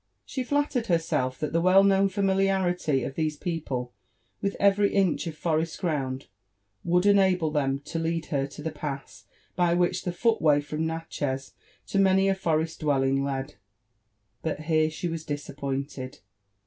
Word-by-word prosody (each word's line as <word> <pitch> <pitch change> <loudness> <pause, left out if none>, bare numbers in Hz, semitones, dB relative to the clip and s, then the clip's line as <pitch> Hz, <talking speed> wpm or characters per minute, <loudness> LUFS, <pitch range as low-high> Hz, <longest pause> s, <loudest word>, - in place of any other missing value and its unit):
She 260 - -3
flattered 285 -3 0
herself 160 -7 0
that 150 0 -3
the 165 - +2
well 185 +2 +6
known 195 0 +4
familiarity 190 -6 +1
of 135 - -4
these 155 0 -1
people 135 -8 -3 0.5
with 200 0 -1
every 200 0 +4
inch 190 -3 +2
of 155 -2 -6
forest 160 0 -1
ground 135 -6 -2 0.6
would 180 +2 +2
enable 190 -5 +4
them 135 -3 +1
to 165 +3 -4
lead 165 0 -1
her 135 -1 +1
to 145 +1 -10
the 160 - -2
pass 140 -10 -6 0.3
by 175 -1 +3
which 175 +1 +1
the 180 - -1
footway 175 -8 +3
from 155 +2 -3
Natchez 145 -5 -4 0.3
to 195 - -1
many 195 0 +4
a 195 - +4
forest 165 -3 -1
d 155 - -4
wellkig 135 -1 +2
led. 135 +1 -3 0.9
But 155 -1 -3
here 155 0 +2
she 160 +3 -4
was 165 -1 -4
disappointed. 140 -2 -5
160 Hz, 160 wpm, -27 LUFS, 145-190 Hz, 0.9 s, well